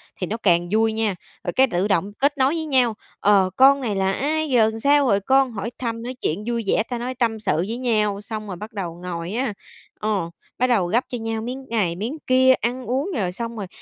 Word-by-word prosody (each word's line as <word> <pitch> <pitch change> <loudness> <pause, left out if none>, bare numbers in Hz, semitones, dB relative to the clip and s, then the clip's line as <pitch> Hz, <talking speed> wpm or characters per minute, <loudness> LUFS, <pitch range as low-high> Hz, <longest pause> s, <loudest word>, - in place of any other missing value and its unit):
thì 185 - -4
nó 220 - -3
càng 175 -5 +2
vui 220 +1 +2
nha, 220 -3 0 0.3
rồi 175 - -2
cái 265 +1 +5
tự 190 -3 0
động 195 0 +1
kết 285 +2 +2
nối 265 +2 +3
với 320 -1 -2
nhau, 255 -6 +3 0.3
ờ, 200 -2 +4
"Con 275 +1 +6
này 220 -5 -2
là 190 0 +1
ai? 310 +6 -1
Giờ 240 -4 +5
làm 220 +1 -2
sao 285 +2 +4
rồi 200 -4 +3
con?" 265 +5 +3
Hỏi 220 +1 -4
thăm, 230 -2 -4
nói 250 +2 -5
chuyện 185 +7 -1
vui 235 -1 -1
vẻ, 215 - +2
ta 245 - -2
nói 250 +2 -4
tâm 230 -3 0
sự 210 -8 0
với 200 +8 -2
nhau, 215 -5 0
xong 215 0 -6
rồi 190 - -5
bắt 210 +5 -9
đầu 180 -5 -4
ngồi 170 0 -4
á, 245 -1 -1 0.5
ờ, 205 -6 -1 0.3
bắt 255 - +2
đầu 215 -8 +2
gắp 230 +8 +2
cho 245 - -4
nhau 225 -1 -3
miếng 255 +4 -6
này, 205 -7 0
miếng 225 - -4
kia, 260 0 +5
ăn 250 +1 -2
uống, 270 - -1
rồi 190 -7 -1
xong 230 +4 -5
rồi 200 -3 -4
225 Hz, 245 wpm, -22 LUFS, 200-255 Hz, 0.5 s, Con